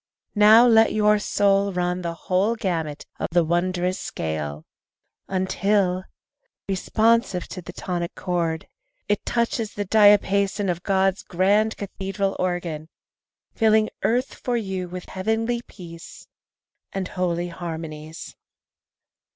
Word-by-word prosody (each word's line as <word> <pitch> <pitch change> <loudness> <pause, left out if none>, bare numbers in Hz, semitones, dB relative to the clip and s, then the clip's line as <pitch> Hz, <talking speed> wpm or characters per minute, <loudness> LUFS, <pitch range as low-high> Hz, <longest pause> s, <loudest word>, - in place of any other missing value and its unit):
Now 215 +3 +7
let 225 -2 +5
your 210 0 +3
soul 200 -1 +2
run 180 0 -1
the 170 -1 -4
whole 190 +6 0
gamut 165 -9 -3
of - - -1
the 175 0 +3
wondrous 180 +2 0
scale 75 -1 -4 0.6
Until, 190 0 0 0.6
responsive 215 0 +1
to 185 - -7
the 170 - -9
tonic 175 -2 -4
chord, 170 -3 -2 0.4
It 205 - 0
touches 230 -2 -1
the 205 - -2
diapason 200 -1 +4
of 175 0 -5
God's 190 0 +1
grand 205 +5 +1
cathedral 195 0 -3
organ, 175 -4 -2 0.6
Filling 220 -1 +3
earth 250 +3 0
for 245 -1 -2
you 190 -4 -3
with 180 0 -7
heavenly 225 +5 -1
peace 170 -3 -11 0.7
And 195 -1 -3
holy 175 -1 -1
harmonies. 160 -2 -7
190 Hz, 115 wpm, -23 LUFS, 175-210 Hz, 0.7 s, Now